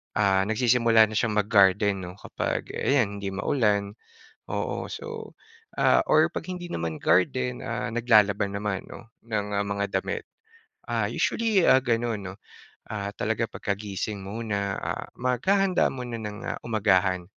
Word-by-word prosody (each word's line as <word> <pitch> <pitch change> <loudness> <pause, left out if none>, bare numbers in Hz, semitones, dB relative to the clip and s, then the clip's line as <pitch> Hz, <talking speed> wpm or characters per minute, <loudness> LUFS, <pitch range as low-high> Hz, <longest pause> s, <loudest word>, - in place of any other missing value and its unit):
ah, 95 -2 +3
nagsisimula 115 0 +4
na 110 - 0
siyang 110 0 0
mag-garden 100 -2 +3
'no, 90 - -9
kapag - - -4
ayan 110 -8 +1
hindi 100 -1 -4
maulan. 100 -2 +1 0.6
Oo, - - -3
so 455 -1 -7 0.5
ah, - - +4
or - - +4
'pag - - -6
hindi 175 -1 -6
naman 80 - -4
garden, 65 -1 +1
ah, - - -3
naglalaba 110 -4 +3
naman 100 -1 -3
'no 115 - -12 0.2
ng 105 -3 -2
mga 100 0 -2
damit. - - -3 0.6
Ah, - - -1
usually, 220 -5 +1
ah, 130 - +6
ganon 120 -3 -1
'no. 95 -1 -7 0.5
Ah, 100 -2 -4
talaga 110 +1 -1
pagkagising 100 0 -4
muna, 100 -1 -3
ah, - - -4
maghahanda 185 - +2
muna 120 -3 -6
ng, 105 -1 -6
ah, - - -3
umagahan 95 -5 +2
105 Hz, 140 wpm, -26 LUFS, 100-120 Hz, 0.6 s, ah